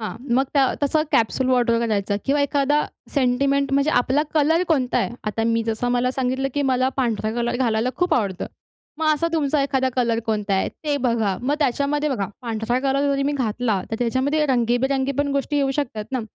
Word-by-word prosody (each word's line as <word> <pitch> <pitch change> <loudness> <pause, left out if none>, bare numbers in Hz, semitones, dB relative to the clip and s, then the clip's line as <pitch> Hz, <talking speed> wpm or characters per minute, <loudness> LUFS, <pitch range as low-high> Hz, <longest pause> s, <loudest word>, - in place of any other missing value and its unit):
हां 215 - -4 0.2
मग 265 - +3
त्या 275 - +5 0.2
तसं 305 +2 +2
कॅप्सूल 255 +3 +2
वॉर्डरोब 235 -2 +2
करायचं 205 -3 0
किंवा 285 +1 +1
एखादा 285 +1 +1 0.3
सेंटिमेंट 275 +1 +1
म्हणजे 280 +2 +2
आपला 265 +4 +1
कलर 320 +3 +3
कोणता 265 -6 +1
आहे? - - -1
आता 220 +1 -1
मी 230 0 +1
जसं 225 +2 -1
मला 245 +1 +1
सांगितलं, 260 +1 -1
की 290 - +1
मला 255 +1 +2
पांढरा 225 -4 0
कलर 240 0 -1
घालायला 235 -2 +1
खूप 355 0 +1
आवडतं. 200 -6 -1 0.5
मग 315 - 0
असा 335 +3 -1
तुमचा 295 -2 +1
एखादा 265 -2 +1
कलर 235 -2 +1
कोणता 210 -3 0
आहे? 190 - +1
ते 295 -2 -3
बघा. 230 -7 0
मग 285 +3 +1
त्याच्यामध्ये 290 +2 0
बघा, 220 -8 -1
पांढरा 230 +1 -1
कलर 275 +1 +1
जरी 275 0 0
मी - - 0
घातला, 230 -5 -1
तर 225 - -2
त्याच्यामध्ये 260 +6 +1
रंगीबेरंगी 265 +2 +1
पण 285 0 +1
गोष्टी 280 +1 -1
येऊ 275 -1 +2
शकतात 235 -7 -3
ना. 255 - 0
260 Hz, 190 wpm, -22 LUFS, 230-280 Hz, 0.5 s, त्या